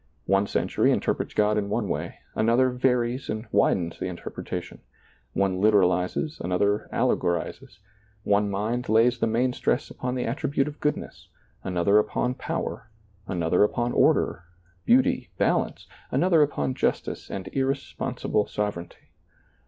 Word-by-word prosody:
One 100 +1 +2
century - - +1
interprets - - -1
God 105 0 +3
in 100 -1 -3
one 105 0 -1
way, - - -3 0.2
another 120 +3 +3
varies 125 0 0
and 110 +2 -3
widens 90 -4 +1
the - - -2
interpretation; 90 -2 -6 0.5
one 95 -1 0
literalizes, 100 - +2
another 100 +4 0
allegorizes; 85 -2 -1 0.5
one 100 0 +2
mind 110 +5 -2
lays 115 +2 +4
the - - +2
main 125 +3 +1
stress 125 - -1
upon 125 0 -3
the 125 - -1
attribute 140 +3 -1
of 150 0 -7
goodness, 150 - -3 0.3
another 95 +3 +3
upon 125 +3 0
power, 115 - -4 0.4
another 90 +1 +2
upon 120 +3 0
order, 90 -6 +2 0.4
beauty, 255 +1 +3
balance, - - 0 0.2
an - - +1
other 175 -4 +4
upon 70 - +1
justice - - -2
and 95 -1 -5
irresponsible 135 -5 -1
sovereignty. 105 -5 -5
110 Hz, 130 wpm, -26 LUFS, 95-125 Hz, 0.5 s, lays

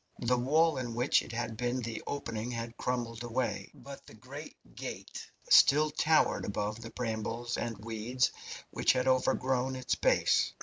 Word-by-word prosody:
The 125 +1 +3
wall 150 +5 +3
in 120 -3 -4
which 125 +3 +3
it - - -9
had 115 -1 -3
been 125 +2 -1
the 115 -1 -4
opening 115 -5 -3
had 115 -1 -5
crumbled 120 -2 -3
away, 120 +1 -2
but - - -11
the - - -13
great - - -10 0.2
gate - - -7 0.2
still 150 +2 +6
towered 155 +1 +2
above 105 +2 -3
the 115 - -7
brambles 115 0 -3
and 115 -3 -3
weeds 115 +4 -1 0.4
which - - +3
had 130 0 0
overgrown 130 0 +1
its 130 0 -1
base. - - +2
120 Hz, 160 wpm, -31 LUFS, 115-130 Hz, 0.4 s, still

